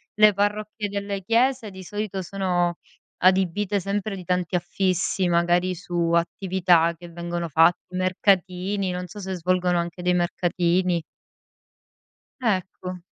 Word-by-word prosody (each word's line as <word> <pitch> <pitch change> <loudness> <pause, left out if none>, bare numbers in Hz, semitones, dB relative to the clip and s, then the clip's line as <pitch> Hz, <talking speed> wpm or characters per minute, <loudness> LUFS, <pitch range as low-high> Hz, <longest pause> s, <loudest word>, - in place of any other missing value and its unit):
le 210 -1 +6
parrocchie 210 +1 -1
delle 200 -1 -4
chiese 235 0 +1
di 190 0 -10
solito 205 0 -4
sono 175 -2 0 0.5
adibite 190 +2 +2
sempre 200 +2 -2
di 180 - -9
tanti 180 0 -1
affissi, 185 +1 0
magari 175 +2 +2
su 175 -1 -2
attività 170 -1 +2
che 175 0 -11
vengono 170 0 -4
fatt 165 +3 +4 0.2
mercatini, 185 +1 +1
non 180 0 -4
so 210 - -10
se 190 0 -4
svolgono 180 0 +1
anche 170 +1 -4
dei 180 0 +2
mercatini. 175 0 +1 1.4
Ecco. 185 -4 -2
185 Hz, 125 wpm, -24 LUFS, 175-200 Hz, 1.4 s, le